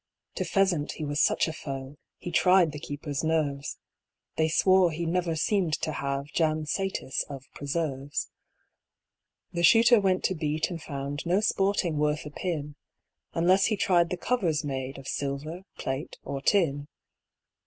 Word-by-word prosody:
To - - -2
pheasant 190 -7 +1
he 155 - -5
was 145 +1 0
such - - +3
a 160 - -3
foe, 135 -2 -6 0.2
He 175 - -6
tried 180 -1 +5
the 150 - -7
keepers' 145 0 -4
nerves; 150 -3 -1 0.6
They 160 - +2
swore 185 +2 +4
he 165 +1 -3
never 170 0 0
seem'd 175 0 +1
to 155 - -1
have 140 -1 -2
Jam 155 -1 +1
satis 190 -5 -2
of 135 -2 -8
preserves. 145 -1 -3 1.2
The 170 - -2
Shooter 230 +5 +7
went 190 -2 +1
to - - +2
beat, 155 +1 -1
and 165 -2 -5
found 140 0 -5
No 180 +3 +3
sporting 195 -6 +1
worth 150 0 0
a 150 - -7
pin, 150 -3 -3 0.6
Unless 185 +4 +4
he 215 - +1
tried 175 -3 +3
the 180 - -2
covers 175 -9 0
made 135 -2 -4
Of 135 0 -10
silver, 145 +6 -4
plate, 135 +4 -4
or 140 -1 -4
tin. 145 -5 +2
160 Hz, 155 wpm, -28 LUFS, 145-180 Hz, 1.2 s, Shooter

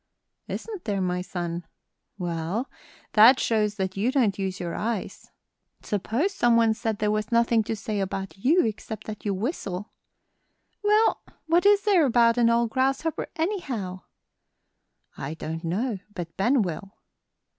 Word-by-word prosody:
"Isn't 425 -5 -6
there, 205 -3 -1
my 180 -1 -1
son? 175 -1 -4 0.5
Well, 175 +6 -3 0.4
that 230 +5 +8
shows 210 -2 +1
that 190 -2 -2
you 215 +6 +1
don't 225 -8 +1
use 190 -1 -2
your 170 -1 -4
eyes. 220 -2 -4 0.5
Suppose 230 - -1
some 240 -9 +3
one 225 -1 +4
said 220 -1 -2
there 210 0 +1
was 215 +1 -2
nothing 235 -1 +3
to 225 - -2
say 215 -1 -3
about 195 0 -3
you 280 - +3
except 220 0 -5
that 215 -1 -8
you 200 -2 0
whistle?" 200 - -4 0.9
"Well, 425 +2 +3 0.2
what 340 +4 +3
is 410 -1 +5
there 370 -8 +4
about 235 -1 +4
an 235 -1 +5
old 235 -1 +2
grasshopper, 270 +5 0
anyhow?" 260 - -3 1.2
"I 145 +4 -4
don't 160 +1 -5
know, 200 +6 -1 0.2
but 170 -2 -6
Ben 240 +4 +3
will." 190 +3 -6
220 Hz, 145 wpm, -26 LUFS, 190-255 Hz, 1.2 s, that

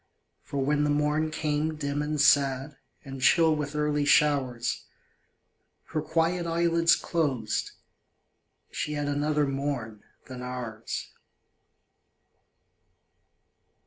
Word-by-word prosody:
For 140 - -7
when 150 +1 +2
the 150 - +1
morn 150 +2 +1
came 155 0 -1
dim 145 -1 -2
and 150 0 -2
sad, 140 0 +3 0.3
And 135 -1 -7
chill 160 +3 +5
with 150 -1 -4
early 150 -1 +1
showers, 140 -5 +2 1.1
Her 155 - -1
quiet 165 +3 0
eyelids 170 0 +3
closed 135 -10 -1 1.0
she 150 - -3
had 145 -1 -2
Another 145 +1 +1
morn 135 -6 -3 0.2
than 130 -1 -8
ours. 125 -3 -5
145 Hz, 100 wpm, -27 LUFS, 135-155 Hz, 1.1 s, chill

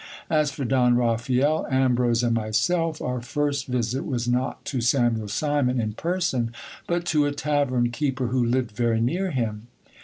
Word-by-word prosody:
As 155 -2 +3
for 140 -1 -5
Don 125 -1 +3
Raphael, 125 +5 +1
Ambrose, 125 -3 +2
and 120 -1 +2
myself, 155 +9 0
our 125 -1 -2
first 140 +2 -2
visit 125 +1 -1
was 120 -4 -2
not 125 +2 -1
to 130 -4 -2
Samuel 120 -3 +1
Simon 130 +2 0
in 110 -2 -2
person, 165 - -1 0.4
but 175 0 -1
to 150 -4 +2
a - - -1
tavern 140 -5 0
keeper 130 -1 -1
who 125 0 +1
lived 120 -1 0
very 115 +1 0
near 175 +12 0
him. 115 -6 -3
125 Hz, 160 wpm, -24 LUFS, 120-145 Hz, 0.4 s, As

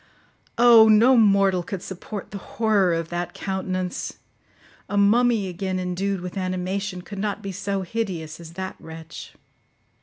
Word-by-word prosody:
Oh! 230 -2 +8
No 225 +4 +6
mortal 195 -4 +4
could 180 +1 -6
support 195 +2 -7
the 200 - -6
horror 210 -4 +1
of 165 -1 -2
that 175 0 -4
countenance. 185 -2 -3 0.7
A 205 - -1
mummy 220 +1 +3
again 185 +1 -3
endued 185 +1 -2
with 180 +2 -6
animation 185 +1 -3
could 200 +1 -8
not 210 +1 -3
be 195 - -4
so 195 +1 -3
hideous 180 -6 -4
as 165 -1 -11
that 190 +1 -5
wretch. 160 0 -10
190 Hz, 145 wpm, -23 LUFS, 180-205 Hz, 0.7 s, Oh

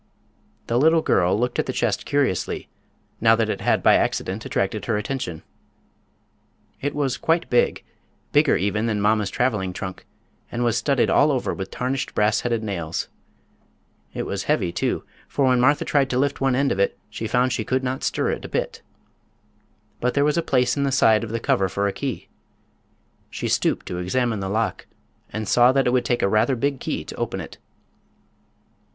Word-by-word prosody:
The 120 +1 +1
little 160 +3 +4
girl 90 +3 +2
looked 125 +1 -1
at - - 0
the - - -1
chest - - -1
curiously, 140 -11 0 0.5
now 115 0 +5
that 110 -1 0
it - - -4
had - - +1
by - - +6
accident 100 +4 -1
attracted 100 +2 -1
her 110 -3 0
attention. 105 - -4 1.4
It 145 - -2
was 140 -4 0
quite 165 +1 +1
big—bigger 120 - 0
even 105 +4 0
than 110 -2 0
mamma's 105 -1 +2
traveling 105 -6 -1
trunk—and 95 +5 -8
was 120 -2 +1
studded 135 -2 +1
all 150 +1 +4
over 130 -3 -1
with 95 0 -5
tarnished 130 +2 -3
brassheaded 110 +2 +1
nails. 85 -6 -3 1.0
It - - -4
was 100 -1 -3
heavy, 105 - +1
too, - - -1 0.2
for 140 - 0
when 130 -1 +3
Martha 145 +3 +3
tried 140 -2 +2
to 125 - -1
lift 140 +1 0
one 135 -2 +2
end 140 +1 +1
of - - -1
it 100 - +1
she 110 +1 -5
found 125 +2 +1
she 110 - -1
could 130 +4 -1
not 130 +1 -3
stir - - 0
it - - -4
a - - -7
bit. - - -3 1.2
But 125 +1 0
there 140 0 +3
was 150 - +2
a 170 - +2
place 125 -5 +1
in 140 - -1
the 140 -1 +1
side 115 -4 +4
of 115 - -5
the 115 +1 -2
cover 115 -7 +1
for 100 +4 -1
a 100 - -2
key. 135 -4 -4 1.0
She - - -4
stooped - - 0
to 90 - -4
examine 110 +4 0
the 95 0 -3
lock, 110 +2 -2 0.4
and 110 -1 -4
saw 120 +5 +5
that 135 0 +2
it 125 - +2
would 125 - +2
take 120 - 0
a - - +4
rather 110 +6 +2
big 140 +2 -1
key - - -3
to - - -8
open - - -3
it. - - -9
120 Hz, 185 wpm, -23 LUFS, 105-135 Hz, 1.4 s, by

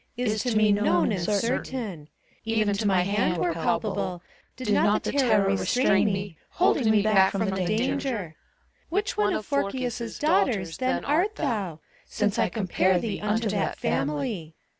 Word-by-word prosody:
Is 215 -4 0
to 235 -2 0
me 215 -1 +4
known 200 -3 +2
and 190 -4 -1
certain: 210 - -2 0.4
Even 220 -2 +1
to 205 +1 -1
my 190 -2 +3
hand 195 -1 0
were 170 0 0
palpable, 180 +1 -2 0.3
Did 230 -5 -2
not 205 +1 +2
the - - -2
terror 250 -8 +3
restrain 200 +1 +2
me, 195 -4 -3
Holding 285 - +2
me 215 -2 +4
back 195 -3 +4
from 205 +2 0
the - - 0 0.2
danger. 230 - -1 0.5
Which 400 +4 -1
one 205 0 +1
of 215 - -4
Phorkys' 245 -3 -2
Daughters 195 - +1
then 255 0 -1
art 355 +9 +1
thouT 190 - -3 0.3
Since 210 -1 -1
I - - +2
compare 185 -1 +1
thee 210 +3 -3
Unto 215 +2 0
that 200 -1 -1
family. 155 - -2
210 Hz, 160 wpm, -26 LUFS, 190-235 Hz, 0.5 s, me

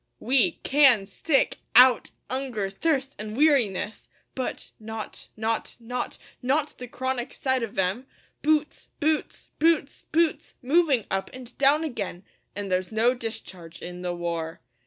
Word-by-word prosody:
We 240 -9 +3
can 270 -8 +5
stick 270 +8 +1 0.2
out 250 0 +7 0.2
'unger, 245 -7 -2
thirst, 275 +3 0
an' 215 0 -5
weariness, 240 -8 +2 0.2
But 260 - -4
not 220 0 -7
not 225 +1 -2
not 245 +1 -4 0.2
not 285 +4 0
the 250 - -6
chronic 260 0 -3
sight 260 -1 0
of 230 -3 -5
'em 195 +8 0 0.3
Boots 305 0 +1
boots 310 +1 -1
boots 315 -3 +2
boots 325 0 +1
moving 280 - +3
up 190 0 -1
and 255 -2 -10
down 285 +3 +4
again! 205 - -4 0.3
An' 200 -1 -4
there's 185 +1 0
no 225 +3 +3
discharge 190 -8 -7
in 180 0 -7
the 175 -1 -2
war. 170 -2 -3
245 Hz, 135 wpm, -26 LUFS, 200-275 Hz, 0.3 s, out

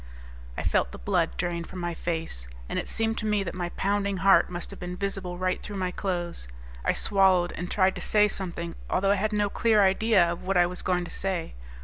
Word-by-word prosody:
I - - -2
felt - - +1
the - - -8
blood - - 0
drain 170 -1 -1
from 185 - -10
my 175 -1 -2
face, 160 - -4 0.2
and - - -2
it - - -5
seemed 225 0 -1
to 215 - -4
me 210 -1 +2
that 170 - -5
my 175 -1 -3
pounding 200 +1 0
heart 195 +1 +5
must 175 -1 -5
have - - -10
been 180 0 -5
visible 195 -2 -3
right 185 0 -1
through 210 - -7
my 185 -2 -1
clothes. 175 - -2 0.4
I - - +3
swallowed 190 -3 +3
and 175 0 -5
tried 190 -1 +3
to - - -7
say 210 -1 +4
something, 170 -4 -4 0.2
although 195 +2 +2
I 200 -1 +2
had 215 +1 +1
no 210 -1 +2
clear 215 0 +3
idea 190 -2 +4
of 170 - -5
what 190 0 0
I 175 - +6
was 180 +1 -5
going 180 -1 0
to - - -9
say. 190 -4 -3
185 Hz, 230 wpm, -27 LUFS, 175-200 Hz, 0.4 s, I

